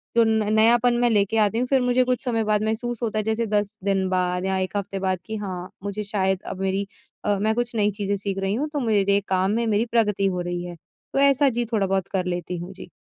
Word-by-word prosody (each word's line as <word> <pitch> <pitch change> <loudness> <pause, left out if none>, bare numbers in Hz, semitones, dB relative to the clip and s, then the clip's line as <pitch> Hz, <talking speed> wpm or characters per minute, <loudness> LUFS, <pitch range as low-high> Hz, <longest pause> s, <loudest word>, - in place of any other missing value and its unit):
तो 235 - +6
न 220 -1 +1
नयापन 235 +2 +5
मैं 240 - +4
लेके 210 0 +2
आती 215 0 +2
हूँ 250 - 0
फिर 265 0 +3
मुझे 250 0 +3
कुछ 250 -1 -1
समय 230 -3 0
बाद 210 0 +1
महसूस 225 +2 -2
होता 215 -2 -1
है - - -1
जैसे 220 +2 0
10 210 0 -1
दिन 195 -1 +1
बाद 180 0 0
या 190 0 0
एक 185 +1 -2
हफ़्ते 200 -1 -3
बाद 185 -2 -1
कि 220 - -5
हाँ, 185 -3 -5
मुझे 200 +1 -3
शायद 190 -2 0
अब 190 - -5
मेरी 195 +1 -1 0.4
अ, 205 -1 +2
मैं 215 +1 +2
कुछ 240 0 -2
नई 210 -1 +2
चीजें 200 0 -2
सीख 195 0 -3
रही 195 0 -1
हूँ 295 +6 -2
तो 295 - 0
मेरे 200 -5 +2
काम 190 +1 +1
में 230 +2 0
मेरी 215 +1 +2
प्रगति 210 -4 +2
हो 180 -2 -1
रही 175 0 -3
है 175 -1 -7 0.4
तो - - +1
ऐसा 280 0 +4
जी 240 -1 -1
थोड़ा 200 -3 +2
बहुत 190 -1 0
कर 185 -2 0
लेती 175 0 -3
हूँ। 175 +3 -7
जी। 185 - -11
205 Hz, 255 wpm, -24 LUFS, 190-225 Hz, 0.4 s, तो